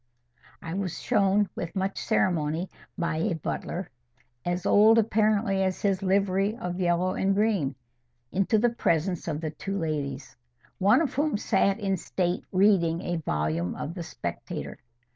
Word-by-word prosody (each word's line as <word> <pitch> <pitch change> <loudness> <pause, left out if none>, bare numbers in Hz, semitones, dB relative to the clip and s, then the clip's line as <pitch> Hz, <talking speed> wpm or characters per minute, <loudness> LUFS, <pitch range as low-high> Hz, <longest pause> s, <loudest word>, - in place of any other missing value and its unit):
I 165 - -5
was 185 -2 -3
shown 205 -3 +2
with 170 - -5
much 190 0 -1
ceremony 165 -1 0 0.3
by 170 -2 -1
a 170 +2 0
butler, 170 +2 -4 0.5
as 175 0 -2
old 220 +2 +6
apparently 215 -2 +2
as 190 -1 -1
his 195 -2 +1
livery 195 +2 +1
of 180 -5 -4
yellow 180 +1 +1
and 195 0 +1
green, 200 - +1 0.6
into 195 +3 +2
the 235 +2 +3
presence 175 -6 0
of 155 -1 -2
the 155 -2 -3
two 195 +6 -4
ladies, 140 -5 -3 0.4
one 200 +10 +5
of 280 - -2
whom 285 -3 +1
sat 200 0 +1
in 195 -2 0
state 180 +1 -2
reading 185 -4 +3
a 175 -1 -2
volume 80 - -1
of 150 - -5
the 175 - -6
Spectator. 165 - -6
185 Hz, 150 wpm, -27 LUFS, 165-200 Hz, 0.6 s, old